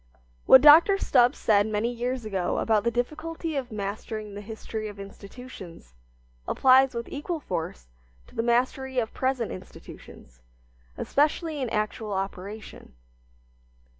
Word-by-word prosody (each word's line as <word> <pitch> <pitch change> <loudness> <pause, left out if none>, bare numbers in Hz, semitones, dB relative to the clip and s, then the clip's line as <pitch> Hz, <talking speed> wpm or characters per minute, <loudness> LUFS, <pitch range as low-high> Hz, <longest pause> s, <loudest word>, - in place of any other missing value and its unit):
What 260 - +9
Dr. 320 +7 +8
Stubbs 250 -9 +3
said 205 -1 +3
many 215 +2 -1
years 245 0 -3
ago 190 -4 -2
about 220 -2 +1
the 235 - +2
difficulty 310 +7 -3
of 260 -3 -3
mastering 210 +1 -5
the 205 - -7
history 220 0 -6
of 205 -1 -10
institutions 195 - -11 0.5
applies 265 -1 +4
with 235 0 -4
equal 315 +4 -4
force 160 - -5 0.4
to - - -20
the - - -1
mastery 255 +3 0
of 225 -3 -1
present 260 -3 -1
institutions, - - -12 0.6
especially 300 +1 0
in 255 - -2
actual 215 0 -2
operation. 195 - -6
230 Hz, 130 wpm, -26 LUFS, 205-260 Hz, 0.6 s, What